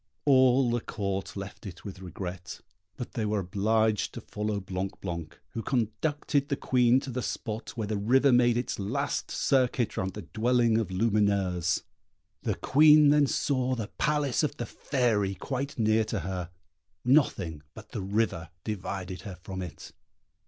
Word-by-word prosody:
All 130 -2 +5
the 120 0 0
Court 100 -2 -4
left 100 0 -7
it 95 +2 -10
with 95 -2 -7
regret; 90 -1 -7 0.4
but 125 - -6
they 115 - -2
were 105 0 0
obliged 105 +3 +1
to - - -6
follow 105 -1 -3
Blanc 95 0 -4
blanc, 85 -4 -6
who 115 - -4
conducted 140 +5 0
the 140 - +1
Queen 125 -1 +3
to 135 - -6
the 125 +1 -2
spot 110 0 -5
where 110 - -1
the 105 0 -2
river 130 +6 +4
made 120 -1 +4
its 120 - -2
last 100 +1 -2
circuit 125 -3 +1
round 95 0 -2
the 105 - -6
dwelling 115 - +2
of 110 - -1
Lumineuse. 95 -4 +1 0.6
The - - -1
Queen 150 +1 +6
then 145 -1 +5
saw 130 -2 0
the 110 -4 -4
Palace 150 -3 +1
of 150 -1 -1
the 120 - -3
Fairy 110 -6 0
quite 135 +8 -4
near 110 -1 +3
to 105 -3 -2
her. 90 0 -4 0.6
Nothing 100 - +2
but - - -11
the - - -4
river 95 -4 -1
divided 95 -3 -4
her 100 -4 -7
from 95 -1 -5
it. 90 -4 -8
110 Hz, 160 wpm, -28 LUFS, 95-125 Hz, 0.6 s, Queen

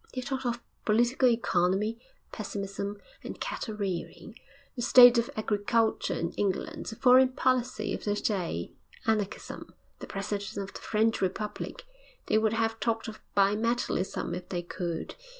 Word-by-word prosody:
They 255 - -1
talked 260 0 -3
of 235 0 -2 0.2
political 240 +4 +3
economy 200 -2 +2
and - - -32
pessimism 200 -1 -4 0.2
and - - -7
cattle 220 - -4
rearing, 195 +1 -4 0.4
the 240 - -4
state 245 0 +8
of 235 - -1
agriculture 215 +1 +1
in 170 - -2
England, 205 +11 -2
the 220 - -5
foreign 255 +2 +6
policy 255 -4 0
of - - -5
the 205 -1 +1
day, 180 - -2 0.3
Anarchism, 215 -3 -2 0.2
the - - -8
President 200 0 -4
of 200 0 -4
the - - -9
French 220 +1 +1
Republic. 200 - -3 0.4
They 215 - +3
would 220 0 +1
have 225 0 0
talked 230 0 -1
of 220 - -7 0.2
bi 200 +1 +4
metallism 230 -6 -1
if 180 0 -8
they 175 -1 -2
could. 170 -1 -4
215 Hz, 150 wpm, -29 LUFS, 200-235 Hz, 0.4 s, state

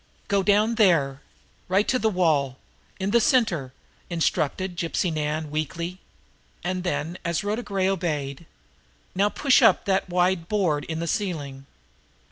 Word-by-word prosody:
"Go 200 -1 +3
down 210 +4 +3
there. 145 -8 +3 0.5
Right 195 +3 +2
to 255 - +2
the 220 - +2
wall 155 -9 +1 0.4
in 195 +1 -1
the 235 +1 +4
center," 180 - +2 0.4
instructed 175 +1 -1
Gypsy 170 0 -1
Nan 155 0 -2
weakly. 170 +4 -3 0.6
And 185 0 -2
then, 175 -1 -3
as 170 +1 -1
Rhoda 210 +3 -1
Gray 195 -4 -1
obeyed: 160 -6 -2 0.7
"Now 200 +3 +2
push 275 +4 +3
up 225 -6 +5
on - - -28
that 190 -1 0
wide 180 -1 +1
board 175 -9 +1
in 160 - -4
the - - -2
ceiling." 145 -8 -3
180 Hz, 145 wpm, -25 LUFS, 155-195 Hz, 0.7 s, up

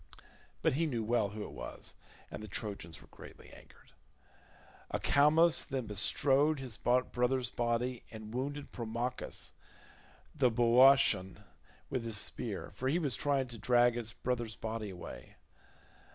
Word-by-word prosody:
But - - +3
he 160 +4 +1
knew 120 -6 -2
well 115 -2 +1
who 105 +1 -6
it - - -8
was, - - -7 0.4
and - - -6
the 110 - -7
Trojans 100 -5 -5
were - - -18
greatly - - -13
angered. - - -17 1.0
Acamas 155 +4 +4
then 130 -4 -3
bestrode 135 +8 +2
his 130 -5 -5
brother's 125 +1 +1
body 120 +1 -1
and 110 -1 -9
wounded 140 +3 -4
Promachus 120 +2 -3 0.8
the 140 -5 +3
Boeotian 120 -5 +5 0.5
with 130 -3 -1
his 115 -2 -2
spear, - - -3
for 130 - -2
he 155 - +2
was 145 -9 -1
trying 140 -2 +1
to 115 -2 -7
drag 120 0 +4
his 115 -2 -3
brother's 120 -3 -3
body 110 -1 -4
away. 90 -2 -9
120 Hz, 140 wpm, -33 LUFS, 110-135 Hz, 1.0 s, Boeotian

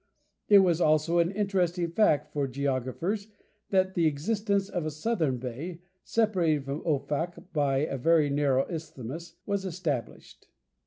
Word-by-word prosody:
It 205 - +9
was 175 -2 +2
also 155 +2 +3
an 170 0 +3
interesting 185 -4 0
fact 150 -6 +2
for 145 -2 0
geographers 140 - -2 0.4
that 190 -1 +2
the 170 -3 +3
existence 200 +6 0
of 175 -4 -3
a 155 - -1
southern 155 - -1
bay, 135 +8 -6 0.2
separated 175 -10 +1
from 140 +3 -4
Offak 165 +4 -2
by 140 -3 +2
a 135 -3 -4
very 155 +1 +3
narrow 140 -2 +2
isthmus, 165 0 -7
was 200 -1 -1
established. 165 -9 -4
165 Hz, 140 wpm, -28 LUFS, 140-185 Hz, 0.4 s, It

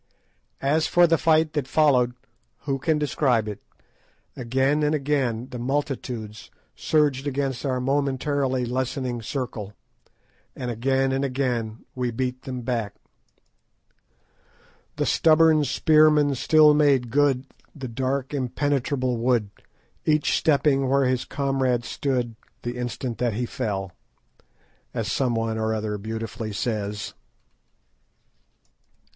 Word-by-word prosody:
As 155 +3 +2
for 175 0 +5
the 165 -2 +2
fight 160 -1 +3
that 145 -4 -2
followed, 130 -5 +3 0.5
who 135 -1 -2
can 155 +3 +1
describe 135 -6 +1
it? 105 -2 -6 0.7
Again 135 +4 +1
and 150 +1 +2
again 135 -4 -1
the 125 - -6
multitudes 125 -5 -3 0.3
surged 145 -3 +1
against 135 -1 -2
our 130 -1 0
momentarily 135 -1 0
lessening 130 0 -2
circle, 110 -4 -5 0.8
and 125 -1 -4
again 135 +3 +1
and 135 +1 0
again 125 -5 -2
we 125 -1 -2
beat 125 +2 -3
them 125 -2 -4
back. 115 -4 -2 2.0
"The - - -1
stubborn 160 -1 +4
spearmen 150 +1 +4
still 150 +3 +5
made 140 -5 +3
good 140 -1 +2 0.3
The 135 -3 -6
dark 130 +3 -2
impenetrable 130 -1 -1
wood, 115 -3 +1 0.5
Each 155 -1 +2
stepping 140 -3 +2
where 140 0 +3
his 130 -1 0
comrade 135 -4 0
stood 125 -4 -2 0.3
The 120 +1 -4
instant 120 -1 -4
that 120 -3 0
he 120 +4 -1
fell," 100 -7 -3 1.0
as - - -2
someone 115 -3 0
or 110 0 0
other 105 -1 -3
beautifully 110 0 -5
says. 105 -1 -3
130 Hz, 115 wpm, -24 LUFS, 120-145 Hz, 2.0 s, for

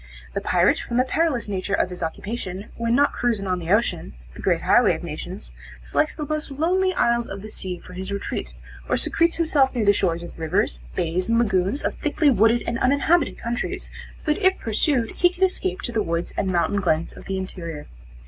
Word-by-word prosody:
The - - -2
pirate, - - +3
from 235 - -3
the 255 - +5
perilous 270 -2 0
nature 200 0 -1
of 185 - 0
his 180 - -8
occupation, 190 +3 -5
when 230 0 0
not 285 +2 +3
cruising 230 -5 0
on 185 -1 0
the 165 -1 -6
ocean, 185 - +1 0.2
the - - -10
great - - +1
highway - - +5
of - - -8
nations, - - -6 0.3
selects 300 - 0
the 300 - -4
most 305 +1 -2
lonely 355 +7 +1
isles 235 0 +2
of 195 0 -7
the 215 - -7
sea 185 -3 -3
for 180 - -13
his 190 +2 -5
retreat, 200 0 -3 0.3
or - - +2
secretes 335 0 +2
himself 290 -6 +2
near 230 -3 +1
the 205 - +6
shores 170 -3 0
of 175 - -10
rivers, 155 - 0 0.2
bays 175 +4 -1
and 230 - +3
lagoons 200 +2 +1
of - - 0
thickly 300 -1 +2
wooded 225 +1 +4
and 235 +1 -2
uninhabited 285 +7 +2
countries, 235 +1 -4 0.3
so 305 - 0
that 395 - -7
if 375 0 +4
pursued 230 +1 0
he 355 - +5
can 360 +1 -3
escape 375 +1 0
to 240 - -3
the 225 -2 0
woods 170 -2 -2
and 195 - -1
mountain 185 +2 +1
glens 165 -3 0
of - - -12
the 195 - -2
interior. 170 -5 -6
225 Hz, 210 wpm, -23 LUFS, 185-285 Hz, 0.3 s, the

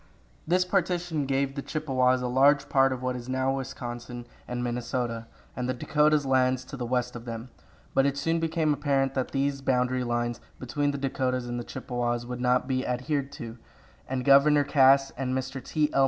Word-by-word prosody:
This 180 +2 +3
partition 175 -5 0
gave 135 0 0
the 140 - -4
Chippewas 130 -5 +1
a - - 0
large 140 +3 +4
part 135 0 +4
of 130 -1 -4
what 125 0 -1
is 125 0 -7
now 130 +1 0
Wisconsin 120 -2 -6 0.2
and 125 0 -3
Minnesota, 120 -1 -3 0.3
and 125 0 -3
the 130 - 0
Dakotas 150 +3 +2
lands 130 -1 +2
to 140 - -8
the 125 -3 -4
west 125 0 -1
of 120 0 -8
them; 115 +1 -6 0.4
but 135 +1 +4
it 140 0 -1
soon 165 +3 0
became 160 -2 +1
apparent 140 -2 0
that 130 -2 -1
these 140 0 -1
boundary 125 -1 +1
lines 120 0 -1 0.2
between 145 +3 -1
the 140 - -2
Dakotas 130 -2 -1
and 120 0 -3
the - - -4
Chippewas 120 -2 -3
would 125 0 -5
not 125 0 +2
be 130 -1 0
adhered 135 +3 -2
to, 115 0 -8 0.5
and 130 -1 -2
Governor 145 +1 +6
Cass 135 -1 +5
and 130 -1 -2
Mr. 130 -1 -5
T. 150 +2 0
L. - - +2
130 Hz, 190 wpm, -27 LUFS, 125-140 Hz, 0.5 s, Governor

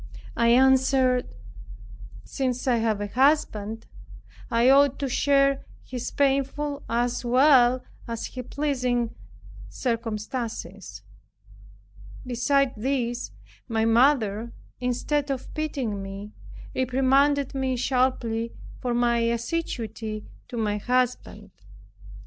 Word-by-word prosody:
I 235 - +2
answered, 260 0 +4 1.0
"Since 255 - -3
I 245 -2 +3
have 220 -2 0
a - - -1
husband, 225 -3 +1 0.6
I 235 +1 +3
ought 275 0 +5
to 280 - -2
share 275 +1 +2 0.2
his 250 -2 -5
painful 280 +1 0
as 240 +2 0
well 255 0 +5 0.2
as 230 -1 -4
his 250 -1 -7
pleasing 250 -5 -1 0.6
circumstances." 230 0 -4 1.2
Besides 255 +2 +1
this, 245 0 -2 0.4
my 225 -2 0
mother, 230 -2 +2 0.3
instead 265 +4 -1
of 270 -2 -4
pitying 270 -10 -3
me, 195 +2 -7 0.4
reprimanded 270 +2 +2
me 265 -1 -1
sharply 240 -3 0 0.3
for 245 -1 -2
my 240 0 +2
assiduity 230 -3 -3 0.2
to 240 - -7
my 210 -2 0
husband. 250 +3 -1
250 Hz, 95 wpm, -25 LUFS, 230-270 Hz, 1.2 s, ought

